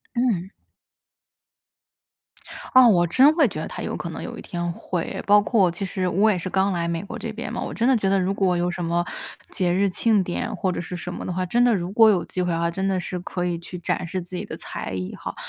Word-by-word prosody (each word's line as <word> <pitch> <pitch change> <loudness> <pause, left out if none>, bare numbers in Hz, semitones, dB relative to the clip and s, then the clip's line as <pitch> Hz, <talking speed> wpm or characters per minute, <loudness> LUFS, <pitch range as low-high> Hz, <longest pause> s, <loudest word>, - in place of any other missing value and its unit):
嗯。 210 -7 0 2.2
啊， 255 -1 +8
我 175 -5 +5
真 265 - +6
会 335 - +5
觉 - - -6
得 - - -4
它 - - -7
有 - - -3
可 - - -5
能 - - -6
有 - - -7
一 - - -7
天 175 -1 -3
会， 175 0 -4
包 205 0 +7
括 205 -3 +3
其 175 +3 -4
实 185 0 -2
我 205 +5 +3
也 185 - 0
是 180 - -4
刚 190 +2 +1
来 170 -2 -1
美 170 +2 -2
国 200 - -7
这 225 - -5
边 230 +1 -6
嘛， 240 0 -4
我 - - -4
真 235 +2 +1
的 265 - +5
觉 195 -3 0
得 195 0 +3
如 190 +1 0
果 190 -3 +1
有 175 +1 0
什 175 0 -4
么 170 +1 0 0.5
节 180 -2 0
日 195 +2 +2
庆 210 +1 +2
典 180 +5 -3
或 185 0 -1
者 175 - -3
是 180 - -6
什 180 0 -6
么 - - -6
的 - - -3
话， 185 +1 -1
真 235 +7 +2
的 245 -1 +4
如 180 -1 -3
果 225 +1 +6
有 190 -5 +2
机 185 - -3
会 180 -1 0
的 165 - -1
话， 170 0 +1
真 190 +3 -2
的 190 -1 +1
是 180 0 -4
可 180 0 -4
以 175 -1 -2
去 175 +1 -8
展 175 0 -2
示 185 +2 -3
自 180 +1 -8
己 - - -3
的 - - -7
才 - - -6
艺 90 0 -4
哈， - - -6
185 Hz, 285 characters per minute, -23 LUFS, 175-205 Hz, 2.2 s, 啊